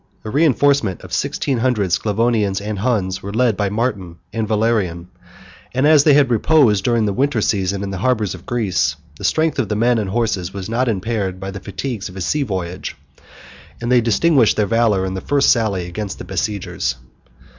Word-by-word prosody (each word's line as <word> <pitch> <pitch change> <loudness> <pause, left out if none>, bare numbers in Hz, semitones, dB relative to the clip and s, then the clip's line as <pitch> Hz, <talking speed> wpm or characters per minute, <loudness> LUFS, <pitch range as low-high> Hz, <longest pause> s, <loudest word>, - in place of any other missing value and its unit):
A 110 - -4
reenforcement 140 - +2
of - - -10
sixteen 135 -4 -1
hundred 115 -7 0
Sclavonians 105 -1 +1
and 105 0 -4
Huns 95 -5 -1
was 100 +2 -6
led 120 -2 +2
by 100 -1 -1
Martin 105 -5 -2 0.2
and 110 -1 -2
Valerian; 105 -6 0 0.7
and 130 +2 +2
as 150 -2 +6
they 145 -1 +6
reposed 120 -4 +3
during 115 -1 +2
the 100 - 0
winter 135 +1 +1
season 100 -1 0
in 100 - -4
the 95 - -4
harbors 110 -3 0
of 90 0 -12
Greece, 95 - 0 0.2
the - - -9
strength 160 -2 +1
of 115 -6 -1
the 105 - 0
men 120 +2 +2
and 100 -3 -3
horses 100 -4 -1
was 95 -2 -5
not 120 +3 0
impaired 100 -2 -2
by 95 +1 -5
the 95 - -7
fatigues 100 +2 -5
of 90 - -13
a - - -5
sea 150 +11 0
voyage; 95 -7 -4 0.8
and 120 +1 -3
they 125 -1 +5
distinguished 120 +2 +3
their 105 - +2
valor 105 -3 +2
in 95 - -3
the 95 - -4
first 140 -1 +3
sally 105 -6 0
against 95 +3 -5
the - - -8
besiegers. 95 - -2
105 Hz, 190 wpm, -19 LUFS, 95-120 Hz, 0.8 s, as